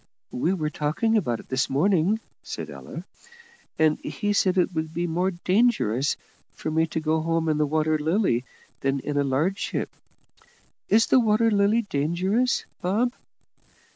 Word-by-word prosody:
"We 160 +8 0
were 155 -5 -1
talking 160 +11 0
about 125 - 0
it - - -23
this 130 0 0
morning," 185 +7 +2 0.2
said - - -6
Ella; - - -8 0.7
"and 155 -1 +3
he 205 +8 -2
said 190 -2 +2
it 180 0 +2
would 160 -1 -3
be 170 +1 0
more 175 +3 0
dangerous 180 - +1 0.4
for 155 - -4
me 160 +1 +2
to 160 - -3
go 155 0 0
home 165 0 0
in 155 -1 +1
the 150 - +2
Water 155 +1 +1
Lily 155 - +1 0.4
than 135 0 0
in 145 - -4
a 145 - +2
large 150 +9 0
ship. - - -3 1.0
Is 225 +2 +5
the 260 - +4
Water 225 0 +3
Lily 205 +3 +3
dangerous, 190 - 0 0.2
Bob?" 215 +7 +1
165 Hz, 160 wpm, -25 LUFS, 150-205 Hz, 1.0 s, Is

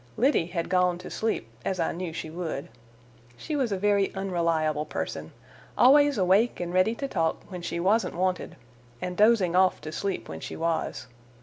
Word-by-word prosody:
Liddy 245 - +3
had 170 -1 -3
gone 180 -1 +2
to 180 - -10
sleep, 220 - -2 0.2
as 185 - -2
I 165 - +1
knew 175 0 -4
she 160 -1 -6
would. 165 -5 -4 0.7
She 305 - -4
was 260 -6 0
a 195 - 0
very 200 0 +2
unreliable 165 -5 0
person: 110 - -5 0.5
always 285 +1 +6
awake 195 +5 +3
and 175 0 -4
ready 185 +5 +3
to 275 - -3
talk 165 -10 -1
when 180 -1 -6
she 170 - -3
wasn't 205 +6 +1
wanted 185 +1 -1 0.4
and 180 +5 -4
dozing 205 -5 +4
off 185 0 +4
to 155 - -6
sleep 195 +4 -3
when 80 - -7
she - - -7
was. 165 -5 -2
180 Hz, 180 wpm, -27 LUFS, 165-205 Hz, 0.7 s, always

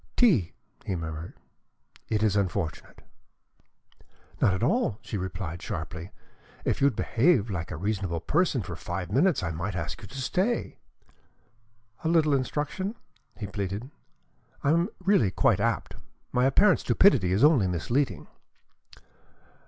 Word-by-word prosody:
"Tea!" 160 - +4 0.3
he 95 - -2
murmured. 80 -1 -6 0.7
"It 110 -1 +1
is 105 -2 +2
unfortunate." 95 -5 -2 1.4
"Not - - +5
at 95 - -3
all!" 135 - +1
she - - -6
replied 90 -3 -4
sharply. 85 +2 -5 0.6
"If - - 0
you'd 140 -1 +4
behave 120 - +2
like 85 -4 -4
a - - -5
reasonable 95 -3 -2
person 140 - +1
for 90 -1 -6
five 90 +2 -5
minutes, 150 - +3
I 85 - -1
might 85 +4 -4
ask 85 0 -4
you 105 - -9
to 100 - -10
stay." 190 - -1 1.2
"A - - 0
little 160 -3 +3
instruction?" 150 - -2 0.4
he 105 - -5
pleaded. 100 +6 -4 0.7
"I 140 - +3
am 170 +4 +2
really 185 - +3
quite - - +2
apt. - - -1 0.4
My 125 0 +2
apparent 185 +9 +5
stupidity 120 - +4
is 100 +6 +2
only 145 - +5
misleading." 120 - -1
105 Hz, 135 wpm, -27 LUFS, 90-150 Hz, 1.4 s, Not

